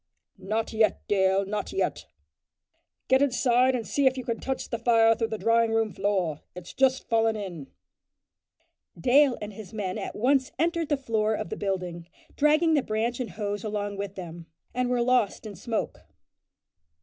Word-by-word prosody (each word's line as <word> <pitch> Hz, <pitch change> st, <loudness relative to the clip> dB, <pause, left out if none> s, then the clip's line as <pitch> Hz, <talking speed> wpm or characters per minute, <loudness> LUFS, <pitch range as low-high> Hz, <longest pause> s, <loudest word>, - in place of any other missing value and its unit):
"Not 215 Hz, +4 st, -2 dB
yet, 220 Hz, -2 st, +1 dB
Dale, 190 Hz, -1 st, +2 dB
not 205 Hz, +1 st, -3 dB
yet," 385 Hz, -, 0 dB
said -, -, -14 dB
Braidwood; -, -, -50 dB
"get 265 Hz, +1 st, +4 dB
inside 255 Hz, -1 st, +3 dB
and 235 Hz, -3 st, -3 dB
see 280 Hz, -2 st, +2 dB
if 260 Hz, 0 st, +2 dB
you 255 Hz, -, -5 dB
can 235 Hz, -2 st, -2 dB
touch 265 Hz, 0 st, -3 dB
the 230 Hz, -, -3 dB
fire 225 Hz, -1 st, +5 dB
through 225 Hz, 0 st, -1 dB
the 220 Hz, -, -4 dB
drawing 230 Hz, 0 st, +2 dB
room 225 Hz, -2 st, +1 dB
floor. 185 Hz, -7 st, -1 dB
It's 180 Hz, -1 st, -9 dB
just 265 Hz, 0 st, +2 dB
fallen 225 Hz, -1 st, +2 dB
in." 180 Hz, -9 st, -6 dB, 1.3 s
Dale 265 Hz, -, +4 dB
and 210 Hz, 0 st, -7 dB
his 220 Hz, +1 st, -10 dB
men 190 Hz, -4 st, -3 dB
at -, -, -5 dB
once 260 Hz, +3 st, +2 dB
entered 335 Hz, +1 st, 0 dB
the 290 Hz, -, +2 dB
front 270 Hz, -, -23 dB
door 215 Hz, 0 st, +2 dB
of 170 Hz, -, -5 dB
the -, -, -4 dB
building, 180 Hz, -4 st, -3 dB, 0.3 s
dragging 310 Hz, +3 st, +3 dB
the 295 Hz, -, +3 dB
branch 230 Hz, +2 st, -2 dB
and 250 Hz, -, -3 dB
hose 205 Hz, -1 st, -4 dB
along 205 Hz, -1 st, -3 dB
with 200 Hz, 0 st, -5 dB
them, 170 Hz, -2 st, -8 dB, 0.3 s
and 250 Hz, 0 st, 0 dB
were 245 Hz, -1 st, +1 dB
lost 245 Hz, -4 st, +1 dB
in 210 Hz, -2 st, -7 dB
smoke. 220 Hz, +5 st, -3 dB
225 Hz, 185 wpm, -27 LUFS, 200-255 Hz, 1.3 s, fire